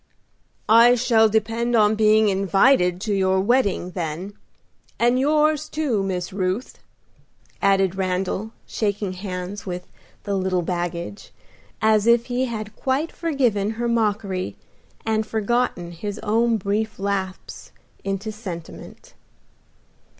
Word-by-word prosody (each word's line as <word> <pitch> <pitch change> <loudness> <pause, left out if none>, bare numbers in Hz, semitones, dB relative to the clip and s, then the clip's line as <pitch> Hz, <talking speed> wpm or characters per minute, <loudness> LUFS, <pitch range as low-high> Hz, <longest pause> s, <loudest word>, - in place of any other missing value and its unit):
"I 235 +3 +7
shall 225 -2 +4
depend 225 +3 0
on 210 -1 +4
being 215 0 +4
invited 195 0 +3
to 215 -1 -1
your 190 -1 +2
wedding, 200 -4 +1
then, 175 +3 -4 0.6
and 240 +2 +3
yours, 305 +2 +2
too, 285 -10 0
Miss 185 -1 -3
Ruth," 190 +5 -2 0.8
added 195 -2 +3
Randal, 190 +3 -2
shaking 205 -3 -2
hands 185 +1 -6
with 180 0 -4 0.4
"the 200 - -3
little 185 -2 0
baggage," 175 +2 -4 0.5
as 215 0 +3
if 235 0 +5
he 255 +1 +1
had 215 -3 -6
quite 275 +5 -1
forgiven 250 -11 0
her 240 0 -1
mockery 210 -5 -1 0.5
and 220 -1 +1
forgotten 220 -5 -1
his 200 +5 -5
own 225 +2 +2
brief 210 +2 -2
lapse 195 -1 -4 0.3
into 195 +2 -3
sentiment. 185 -6 -9
210 Hz, 115 wpm, -23 LUFS, 190-230 Hz, 0.8 s, I